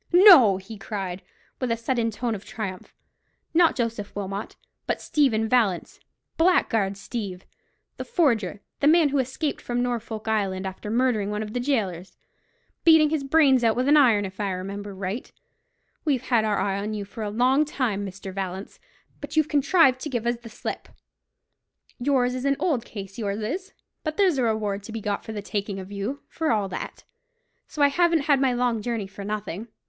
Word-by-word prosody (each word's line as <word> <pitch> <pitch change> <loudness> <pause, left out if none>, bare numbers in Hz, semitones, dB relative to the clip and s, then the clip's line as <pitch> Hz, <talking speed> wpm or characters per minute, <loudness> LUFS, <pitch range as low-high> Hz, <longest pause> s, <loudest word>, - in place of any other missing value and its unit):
"No," 345 - +8
he 200 +3 -10
cried, 195 -2 -4 0.4
with 255 -3 -1
a 230 - +1
sudden 230 0 0
tone 230 +2 -2
of 200 -2 -6
triumph, 195 -5 -6 0.6
"not 335 0 +5
Joseph 230 -4 -3
Wilmot, 200 0 -5 0.3
but - - 0
Stephen 230 -7 +1
Vallance—Blackguard 225 - 0
Steeve, 195 -3 -6 0.5
the - - -4
forger—the 235 - 0
man 320 -1 +5
who 280 0 +1
escaped 265 +4 -2
from 245 0 -1
Norfolk 225 -3 -4
Island, 195 -3 0
after 190 +2 -6
murdering 230 -3 +1
one 210 +1 -2
of 215 0 -7
the 245 - -1
gaolers—beating 260 - 0
his 310 -3 0
brains 275 -3 +4
out 225 -1 +3
with 250 +2 0
an 295 - +6
iron, 235 -8 +5
if 190 +1 -9
I 205 -1 0
remember 200 +2 -6
right. 195 +5 -4 0.7
We've 275 -6 0
had 235 -4 +2
our 210 -2 +1
eye 195 0 0
on 210 +2 -3
you 205 -1 -4
for 200 +3 -9
a 210 - -2
long 255 +7 +3
time, 250 -9 -2
Mr. 195 0 -7
Vallance; 190 0 -5 0.4
but 290 +2 -7
you've 310 -1 +3
contrived 285 -2 +4
to 300 - -4
give 240 -4 -2
us 240 0 +1
the 230 0 -12
slip. 220 - -6 1.1
Yours 250 -1 +2
is 255 +1 -4
an 275 0 +2
old 265 -10 0
case, 195 0 -8
yours 205 -1 -2
is; 370 - -4 0.3
but 310 -1 -3
there's 370 -9 +3
a - - +2
reward 215 -3 0
to 210 - -10
be 225 - -4
got 205 -1 -2
for - - -7
the 210 -2 -5
taking 200 -1 -3
of 190 +1 -9
you, 210 +8 -4
for 320 -4 -1
all 210 -3 +1
that. - - -6 0.6
So 295 - -1
I 285 - +6
haven't 335 +1 +3
had 280 -1 +3
my 265 -2 +3
long 245 -2 0
journey 230 -2 -2
for 195 +1 -9
nothing." 210 0 -4
230 Hz, 185 wpm, -25 LUFS, 200-275 Hz, 1.1 s, No